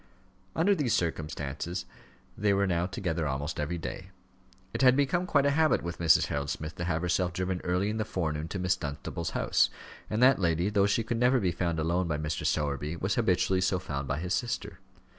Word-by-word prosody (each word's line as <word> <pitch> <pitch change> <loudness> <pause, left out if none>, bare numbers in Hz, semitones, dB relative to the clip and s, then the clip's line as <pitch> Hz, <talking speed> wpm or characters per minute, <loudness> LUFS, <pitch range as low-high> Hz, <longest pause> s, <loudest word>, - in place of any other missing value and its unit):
Under 185 +5 +3
these 145 - +1
circumstances 80 +1 -3 0.5
they 105 0 +2
were 100 0 +2
now 90 -1 0
together 85 -5 -2
almost 70 +3 -3
every 75 +4 -2
day. 90 +3 -6 0.6
It - - -2
had 130 -1 +6
become 145 +6 +1
quite 140 -4 +3
a 140 - +4
habit 155 +1 +3
with 85 0 -5
Mrs. 85 -2 +5
Harold 70 0 -3
Smith 75 +3 -4
to 85 - -3
have 85 -1 -1
herself 90 0 +1
driven 90 0 -2
early 90 +3 0
in 110 +1 -2
the 110 - 0
forenoon 80 -6 -2
to 95 - -5
Miss 90 0 +1
Dunstable's 70 -2 -4
house; - - +3 0.4
and 110 - -1
that 130 -3 +6
lady, 85 +1 +1
though 100 -1 +3
she 115 +3 +1
could 115 +1 -2
never 125 +1 +4
be 95 -5 +1
found 85 -1 -1
alone 85 +3 0
by 75 -2 -1
Mr. 75 0 -2
Sowerby, 75 +1 -1
was 95 +4 -1
habitually 95 -4 +2
so 95 0 +2
found 70 -5 -4
by 70 - -1
his 90 +3 -2
sister. 120 +2 -3
90 Hz, 205 wpm, -29 LUFS, 80-105 Hz, 0.6 s, had